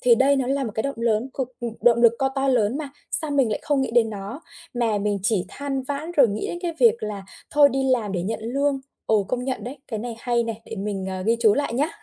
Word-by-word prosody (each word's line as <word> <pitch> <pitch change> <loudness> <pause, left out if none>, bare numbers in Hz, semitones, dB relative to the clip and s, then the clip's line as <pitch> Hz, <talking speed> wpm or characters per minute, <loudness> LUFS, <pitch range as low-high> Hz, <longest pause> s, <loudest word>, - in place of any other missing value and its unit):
thì 240 -2 +6
đây 275 +3 +4
nó 260 -2 0
là 275 0 0
một 220 - -3
cái 220 - 0
động 275 0 -2
lớn 230 +2 +1
cực, 255 -2 -3
ừm 235 -2 -3
động 235 0 +4
lực 230 -1 +7
co 270 - +2
to 270 0 -1
lớn 245 +1 +2
mà, 295 -3 -4 0.2
sao 305 -1 -2
mình 270 -5 +2
lại 215 - -1
không 290 -3 +1
nghĩ 265 - -1
đến 230 -2 +3
nó, 205 +8 -6 0.3
mà 225 -4 +1
mình 205 0 0
chỉ 200 -3 +1
than 275 -2 -3
vãn 285 +5 -4
rồi 280 -8 +5
nghĩ 205 +2 -3
đến 345 - -4
cái 340 -1 -1
việc 235 -1 +5
là 210 -2 -4 0.3
thôi 290 -1 +6
đi 270 0 -1
làm 220 -6 +1
để 175 -2 -1
nhận 220 +3 -3
lương. 275 +3 0 0.3
Ồ, 215 -2 +3
công 250 +5 -3
nhận 260 -2 -3
đấy, 265 +3 -7
cái 220 - -3
này 235 0 -5
hay 240 -1 +1
này, 225 -1 -5
để 225 - -7
mình, 195 -1 -3
ờ, 185 0 -4
ghi 230 +1 +3
chú 215 -3 +5
lại 285 -4 -1
nhá. 290 +5 +1
240 Hz, 275 wpm, -24 LUFS, 215-270 Hz, 0.3 s, lực